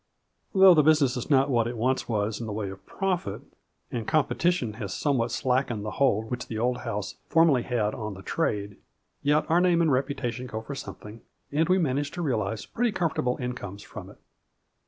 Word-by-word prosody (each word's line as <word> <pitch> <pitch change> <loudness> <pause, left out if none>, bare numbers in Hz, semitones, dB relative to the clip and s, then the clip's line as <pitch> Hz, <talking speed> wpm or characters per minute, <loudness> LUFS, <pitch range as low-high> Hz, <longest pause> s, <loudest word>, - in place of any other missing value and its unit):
Though 190 -1 +9
the 155 - +5
business 150 -4 +4
is 125 - -4
not 135 -1 +4
what 115 -2 +2
it 120 0 -4
once 130 +4 0
was 105 -1 -1
in 115 - -4
the - - -4
way 105 -2 -3
of 95 - -12
profit, 180 - -2 0.5
and 115 -3 -4
competition 155 -4 +1
has 100 -3 -4
some 140 -4 +1
what 115 +1 0
slackened 125 -3 0
the 105 - -3
hold 110 -5 +1
which 125 0 -3
the 110 - -5
old 125 +2 0
house 105 -4 -4
formerly 165 -6 +4
had 115 -4 -1
on 105 -3 -5
the 95 - -11
trade, 105 -10 -2 0.4
yet 150 +1 +2
our 170 +2 +3
name 180 -2 +3
and 165 -3 +3
reputation 130 -2 -1
go 110 -2 -5
for 140 - -6
something, 110 -4 -9 0.3
and 160 +4 +1
we 185 - +5
manage 145 -4 0
to 175 - -3
realize 110 -7 -1
pretty 240 0 0
comfortable 145 -9 0
incomes 115 -6 -5
from - - -9
it. - - -15
125 Hz, 200 wpm, -27 LUFS, 110-150 Hz, 0.5 s, Though